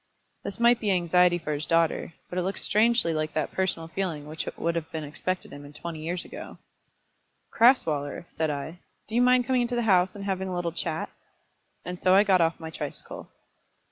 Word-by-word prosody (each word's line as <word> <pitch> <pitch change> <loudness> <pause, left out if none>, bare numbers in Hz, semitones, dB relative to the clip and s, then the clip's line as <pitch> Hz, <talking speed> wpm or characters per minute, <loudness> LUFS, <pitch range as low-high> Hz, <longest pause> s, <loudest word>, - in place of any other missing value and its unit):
This 195 - -6
might 235 0 +5
be 210 - -1
anxiety 180 -1 +4
for 155 -3 -3
his 145 0 -3
daughter; 165 0 +1
but 180 - -3
it - - +1
looked 190 +2 -2
strangely 220 -4 +3
like 155 0 -2
that 155 -3 -1
personal 180 -3 -1
feeling 165 -4 -3
which 155 +1 -4
would 170 +1 0
have 165 -1 -4
been 160 -1 -4
expected 185 +5 -4
in 145 - -9
him 145 +1 -12
twenty 165 0 -6
years 170 +3 -3
ago. - - -9 0.9
"Crasweller," 165 - +3
said 160 -1 -1
I, 150 +4 -5 0.3
"do 220 - -10
you 240 - +3
mind 250 0 +4
coming 255 0 +2
into 240 0 -1
the 240 - 0
house, 185 -3 +3
and 200 -1 -7
having 190 -1 -2
a 185 - -3
little 175 -1 -1
chat?" 160 -1 -3 0.7
and 180 +1 -5
so 185 0 +4
I 200 - +7
got 190 -3 +4
off 165 0 +1
my 160 -1 -7
tricycle. 150 -3 -7
175 Hz, 205 wpm, -27 LUFS, 160-195 Hz, 0.9 s, I